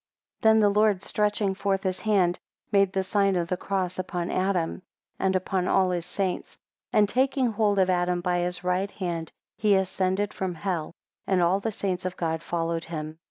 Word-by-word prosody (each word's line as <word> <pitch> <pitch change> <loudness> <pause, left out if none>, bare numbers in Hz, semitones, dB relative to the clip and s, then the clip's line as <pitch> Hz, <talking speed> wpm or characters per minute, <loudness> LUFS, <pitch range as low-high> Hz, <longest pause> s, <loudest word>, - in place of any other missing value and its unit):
11 220 0 +6
Then - - +4
the 205 -1 +4
Lord 210 -3 +3
stretching 210 -2 0
forth 195 0 -1
his 185 -1 -1
hand, 190 -5 +2 0.3
made 200 -2 +4
the 190 0 0
sign 195 0 +2
of 170 -1 -1
the 185 - +1
cross 185 -1 -2
upon 180 -1 -3
Adam, 185 -2 0 0.4
and 190 0 +1
upon 185 0 0
all 185 -1 +3
his 175 -1 -2
saints. 185 0 -3 0.3
12 - - -1
And 205 - +4
taking 260 +1 +1
hold 210 -2 +1
of 190 -1 +4
Adam 180 0 +1
by 175 0 0
his 180 0 -2
right 180 +2 0
hand, 170 -5 -4 0.3
he 210 -2 +3
ascended 190 +1 0
from 185 -2 -3
hell, 170 -3 -3 0.3
and 190 -2 +2
all 180 +3 +3
the 220 +2 -2
saints 190 -3 -2
of 185 0 -3
God 160 -2 -1
followed 165 -1 -2
him. 155 -1 -6
185 Hz, 195 wpm, -26 LUFS, 175-200 Hz, 0.4 s, 11